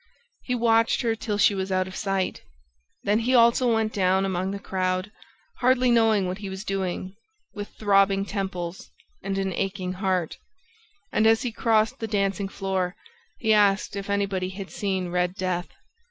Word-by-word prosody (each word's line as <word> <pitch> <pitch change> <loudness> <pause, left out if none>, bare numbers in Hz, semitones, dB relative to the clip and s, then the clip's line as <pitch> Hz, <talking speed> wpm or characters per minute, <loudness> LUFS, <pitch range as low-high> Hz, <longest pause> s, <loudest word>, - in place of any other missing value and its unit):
He 250 - -2
watched 230 0 +3
her 225 -1 +1
till 210 -2 -3
she 205 - +5
was 190 0 -3
out 185 0 +1
of 185 - -9
sight. 195 -2 -1 0.6
Then 205 +2 +2
he 250 +3 +1
also 235 +1 +5
went 220 -1 +1
down 190 0 +2
among 185 0 -1
the 200 - -3
crowd, 185 0 -2 0.5
hardly 255 0 +3
knowing 225 -4 +4
what 185 +2 -4
he 200 -2 -6
was 190 +1 -6
doing, 190 -2 -3 0.4
with 205 0 -6
throbbing 195 -1 +2
temples 190 -3 -4 0.3
and 195 0 -3
an 195 -1 -1
aching 185 0 -2
heart; 185 -3 -1 0.7
and, 220 - +3
as 225 +3 +4
he 245 - -2
crossed 220 -1 +1
the 225 - -3
dancing 200 -1 -1
floor, 190 -2 -2 0.4
he 220 -1 +2
asked 205 -1 +3
if 200 0 -5
anybody 200 -2 0
had 190 0 -8
seen 190 -3 -2
Red 180 +1 0
Death. 185 -2 -2
195 Hz, 170 wpm, -25 LUFS, 185-215 Hz, 0.7 s, she